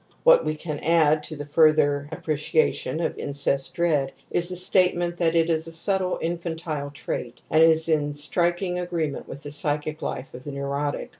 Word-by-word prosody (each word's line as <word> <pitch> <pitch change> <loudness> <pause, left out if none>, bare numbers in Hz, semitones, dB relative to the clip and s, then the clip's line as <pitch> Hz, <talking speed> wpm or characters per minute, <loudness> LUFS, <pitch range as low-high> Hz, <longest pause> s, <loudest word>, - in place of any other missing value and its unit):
What - - +6
we 155 - -2
can 155 -1 -5
add 155 -1 +3
to 155 - -7
the 145 0 -7
further 145 -1 +3
apprecia 155 0 0
tion 160 - -4
of - - -3
incest 140 +3 -1
dread 155 -6 +1 0.2
is 175 0 +1
the 180 - -4
statement 180 -1 +2
that 170 -1 +1
it 165 -1 +3
is 160 -1 0
a - - -6
subtle 185 +2 0
infantile 165 -3 -3
trait 125 -4 -6
and 155 - +4
is 160 0 +5
in 145 -2 0
striking 175 +4 0
agree 175 -3 -2
jnent - - -8
with 140 - -9
the 145 - -6
psychic 150 +1 +1
life 130 - -5
of 125 - -10
the 145 - -7
neurotic. 140 +1 -3
155 Hz, 190 wpm, -24 LUFS, 145-170 Hz, 0.2 s, What